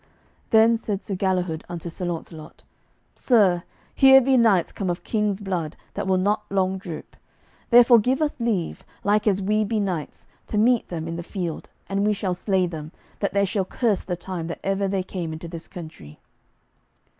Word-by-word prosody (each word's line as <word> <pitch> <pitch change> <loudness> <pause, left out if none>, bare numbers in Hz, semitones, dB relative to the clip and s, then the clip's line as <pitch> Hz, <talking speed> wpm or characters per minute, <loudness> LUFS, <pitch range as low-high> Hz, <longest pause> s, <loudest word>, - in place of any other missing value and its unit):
Then 225 +1 +5
said 210 -3 -4
Sir 200 - -5
Galihud 180 -4 -1
unto 175 -1 -6
Sir 170 +2 -5
Launcelot, 160 -2 -7 0.5
"Sir, 200 -8 +3 0.3
here 265 0 +8
be 265 +1 +2
knights 220 -8 +4
come 195 -3 -3
of 175 - -3
king's 210 -3 0
blood 175 -6 -3 0.2
that - - -3
will 190 -1 +3
not 205 +3 +1
long 190 -1 0
droop; 170 -5 -8 0.5
therefore 240 0 +7
give 255 +5 +1
us 305 -2 0
leave, 220 -8 -1 0.2
like 210 +1 +2
as 195 -1 +2
we 215 +2 +2
be 215 +1 -1
knights, 180 -7 -3 0.2
to 210 - -3
meet 235 +2 +3
them 165 -2 -5
in 165 0 -4
the - - -4
field, 175 -2 -5 0.2
and 195 +1 -1
we 210 0 +3
shall 195 -2 -2
slay 185 +1 +1
them, 155 -3 -6 0.3
that 200 - -1
they 200 0 +4
shall 195 0 -1
curse 210 +1 0
the 180 - -3
time 175 -2 -5
that 170 - -6
ever 195 0 0
they 190 -1 -1
came 175 -4 -5
into 160 +2 -7
this 165 0 -8
country." 155 - -10
190 Hz, 185 wpm, -24 LUFS, 175-210 Hz, 0.5 s, here